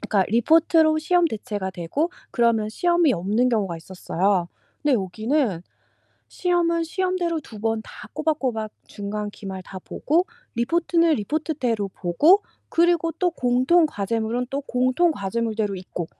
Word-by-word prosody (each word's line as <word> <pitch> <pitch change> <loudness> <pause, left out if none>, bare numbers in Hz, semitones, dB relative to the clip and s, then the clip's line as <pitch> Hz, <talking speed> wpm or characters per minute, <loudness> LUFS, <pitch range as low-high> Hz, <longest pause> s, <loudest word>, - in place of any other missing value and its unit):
그러니까 205 -3 +1
리포트로 315 +6 +4
시험 350 +2 +2
대체가 205 -6 -4
되고 185 - -2 0.2
그러면 230 -3 +2
시험이 345 +3 +2
없는 210 +8 +1
경우가 200 -8 0
있었어요. 180 +1 -1 0.4
근데 285 -3 +4
여기는 215 - 0 0.7
시험은 340 -2 +1
시험대로 355 -2 -1
2 220 -6 -12
번 225 0 -1
다 215 - -12
꼬박꼬박 265 -9 -1 0.2
중간 205 0 -4
기말 190 -2 -7
다 190 0 -9
보고 335 - 0 0.3
리포트는 335 +5 +2
리포트대로 245 -4 -1
보고 295 - +3 0.3
그리고 335 -1 +2
또 360 -1 0
공통 260 +5 +3
과제물은 225 +2 -2
또 280 +1 -2
공통 255 +7 +2
과제물대로 215 0 -2
있고. 180 -2 -6
245 Hz, 320 characters per minute, -23 LUFS, 205-325 Hz, 0.7 s, 리포트로